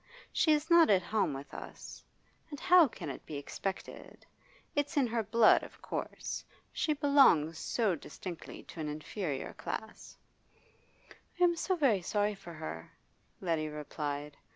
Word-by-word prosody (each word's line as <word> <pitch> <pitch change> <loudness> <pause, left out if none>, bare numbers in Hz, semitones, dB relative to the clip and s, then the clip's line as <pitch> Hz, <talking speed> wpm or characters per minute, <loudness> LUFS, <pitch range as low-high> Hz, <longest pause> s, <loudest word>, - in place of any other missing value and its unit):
She 315 - +3
is 300 +1 0
not 335 -1 +7
at 190 -3 +4
home 205 -4 +1
with 140 +1 -8
us. - - -9 0.5
And 290 -2 -7
how 360 -3 +7
can 225 - -8
it - - -9
be 150 - -5
expected? 190 +6 -6 0.5
It's 290 0 -1
in 275 - +5
her 230 -1 0
blood, 220 +1 +5
of - - -12
course; - - -4 0.3
she 305 - +1
belongs 270 - +4
so 220 -6 +1
distinctly 170 +2 -8
to - - -11
an 155 -1 -2
inferior 150 0 -4
class.' 220 - -7 1.2
'I - - +4
am 345 -1 +5
so 370 +3 0
very 260 - +3
sorry 205 +3 0
for 195 -4 -11
her,' 80 - -7 0.5
Letty 165 -4 0
replied. 150 -1 -5
200 Hz, 150 wpm, -32 LUFS, -, 1.2 s, not